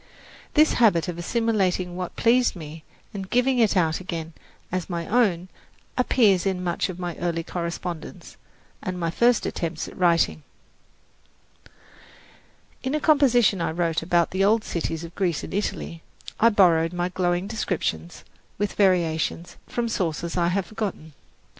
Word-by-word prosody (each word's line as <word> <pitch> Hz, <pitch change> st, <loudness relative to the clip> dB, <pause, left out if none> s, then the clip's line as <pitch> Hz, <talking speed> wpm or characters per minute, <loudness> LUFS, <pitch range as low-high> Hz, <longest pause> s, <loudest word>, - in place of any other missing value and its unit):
This 310 Hz, +1 st, +5 dB
habit 175 Hz, -9 st, +4 dB
of 175 Hz, -1 st, -5 dB
assimilating 185 Hz, -3 st, 0 dB
what 180 Hz, -1 st, -5 dB
pleased 245 Hz, 0 st, +3 dB
me 155 Hz, -1 st, -9 dB, 0.3 s
and 195 Hz, -2 st, -6 dB
giving 250 Hz, +1 st, +2 dB
it 215 Hz, -4 st, +3 dB
out 160 Hz, -3 st, +2 dB
again 170 Hz, -3 st, -5 dB, 0.4 s
as 185 Hz, 0 st, -3 dB
my 170 Hz, -2 st, -3 dB
own 195 Hz, -6 st, +1 dB, 0.5 s
appears 220 Hz, -7 st, +3 dB
in 185 Hz, -1 st, -1 dB
much 175 Hz, +2 st, -1 dB
of 180 Hz, -, -6 dB
my 175 Hz, -2 st, -4 dB
early 170 Hz, -1 st, -2 dB
correspondence 170 Hz, -1 st, -6 dB, 0.5 s
and 185 Hz, -1 st, -4 dB
my 165 Hz, -1 st, -1 dB
first 235 Hz, +6 st, +3 dB
attempts 165 Hz, -2 st, -3 dB
at -, -, -11 dB
writing. 170 Hz, -, +2 dB, 2.4 s
In 260 Hz, +3 st, -2 dB
a -, -, +1 dB
composition 255 Hz, -, +4 dB
which 170 Hz, -, 0 dB
I -, -, -1 dB
wrote 165 Hz, -1 st, 0 dB
about 170 Hz, 0 st, +1 dB
the 190 Hz, +1 st, +1 dB
old 215 Hz, +2 st, +3 dB
cities 165 Hz, -1 st, -3 dB
of 170 Hz, 0 st, -9 dB
Greece 175 Hz, -4 st, -1 dB
and -, -, -7 dB
Italy, 185 Hz, -4 st, -3 dB, 0.4 s
I 230 Hz, -, +6 dB
borrowed 170 Hz, -6 st, +4 dB
my 175 Hz, 0 st, -1 dB
glowing 175 Hz, 0 st, 0 dB
descriptions, 175 Hz, -, -3 dB, 0.3 s
with 205 Hz, 0 st, -1 dB
variations, 175 Hz, -3 st, +1 dB
from 240 Hz, -1 st, -2 dB
sources 170 Hz, -5 st, -2 dB
I 175 Hz, -1 st, +2 dB
have 185 Hz, +2 st, 0 dB
forgotten. 190 Hz, -7 st, -5 dB
180 Hz, 150 wpm, -24 LUFS, 170-210 Hz, 2.4 s, I